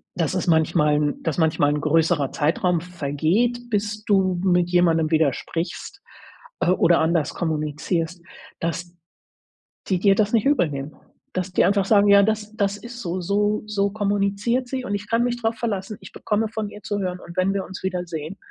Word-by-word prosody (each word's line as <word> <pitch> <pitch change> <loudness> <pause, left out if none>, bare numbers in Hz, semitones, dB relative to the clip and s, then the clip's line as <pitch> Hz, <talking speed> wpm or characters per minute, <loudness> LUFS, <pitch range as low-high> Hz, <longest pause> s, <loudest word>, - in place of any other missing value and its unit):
dass 165 -2 0
es 185 - -2
manchmal 160 -2 +3
'n 150 0 -1
dass 160 - -2
manchmal 155 -3 +2
'n 150 - -1
größerer 155 -2 +2
Zeitraum 165 +3 +1
vergeht, 180 +8 0
bis 210 0 -2
du 190 -3 +2
mit 180 -2 +2
jemandem 165 -3 +2
wieder 155 -3 +3
sprichst, 180 - -5 0.6
äh, - - +2
oder 170 -2 +4
anders 160 -1 +1
kommunizierst, 160 +2 -2 0.4
dass 170 +1 -4 0.9
die 185 - +1
dir 195 0 +5
das 210 +1 +1
nicht 225 - +3
übelnehmen. 150 - 0 0.4
Dass 185 0 -3
die - - +3
einfach 200 -1 +2
sagen: 205 -1 +4
„Ja, 200 0 +7
das 215 0 -1
das 200 -2 0
ist 240 +3 -10
so. 185 -3 -3
So 205 +3 0
so 200 -1 0
kommuniziert 205 +4 0
sie, 260 0 -3
und 205 - -3
ich 205 +1 -5
kann 230 +1 +2
mich 240 0 -2
drauf 225 0 0
verlassen, 210 -3 -3
ich 190 - -12
bekomme 215 +1 -1
von 215 -1 -4
ihr 210 - -12
zu 205 - -3
hören. 180 -1 -3
Und 170 - -11
wenn 190 +2 +2
wir 195 -1 -2
uns 190 - -9
wiedersehen, 175 -2 -4
185 Hz, 180 wpm, -23 LUFS, 165-210 Hz, 0.9 s, Ja